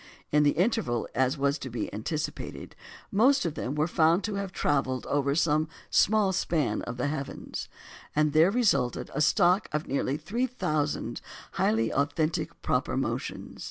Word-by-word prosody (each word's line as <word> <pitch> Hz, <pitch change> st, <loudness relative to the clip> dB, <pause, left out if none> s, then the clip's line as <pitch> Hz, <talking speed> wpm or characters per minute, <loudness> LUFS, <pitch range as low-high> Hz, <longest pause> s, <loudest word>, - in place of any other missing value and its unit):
In 150 Hz, -, +4 dB
the 145 Hz, -1 st, +4 dB
interval, 180 Hz, -, +1 dB
as 130 Hz, +3 st, +1 dB
was 140 Hz, +1 st, +1 dB
to 130 Hz, -, -6 dB
be 115 Hz, -2 st, -4 dB
anticipated, 150 Hz, +9 st, -5 dB, 0.4 s
most 255 Hz, +6 st, +4 dB
of 165 Hz, -, -1 dB
them 140 Hz, -2 st, -4 dB
were 150 Hz, +1 st, +2 dB
found 165 Hz, +2 st, +3 dB
to 215 Hz, -, -2 dB
have 200 Hz, -1 st, -3 dB
travelled 135 Hz, -6 st, 0 dB
over 140 Hz, 0 st, 0 dB
some 155 Hz, -1 st, +2 dB, 0.2 s
small 205 Hz, -2 st, +3 dB
span 165 Hz, -6 st, 0 dB
of 120 Hz, +1 st, -6 dB
the 125 Hz, -, -1 dB
heavens, 145 Hz, -1 st, -4 dB, 0.5 s
and 150 Hz, -1 st, +2 dB
there 160 Hz, +3 st, +6 dB
resulted 200 Hz, -, +1 dB
a 150 Hz, -, -1 dB
stock 180 Hz, +4 st, +3 dB
of 150 Hz, 0 st, -2 dB
nearly 140 Hz, 0 st, -1 dB
three 240 Hz, +10 st, -1 dB
thousand 155 Hz, -, -2 dB, 0.3 s
highly 110 Hz, +1 st, +1 dB
authentic 155 Hz, +3 st, -1 dB
proper -, -, 0 dB
motions. -, -, -4 dB
150 Hz, 160 wpm, -28 LUFS, 140-185 Hz, 0.5 s, there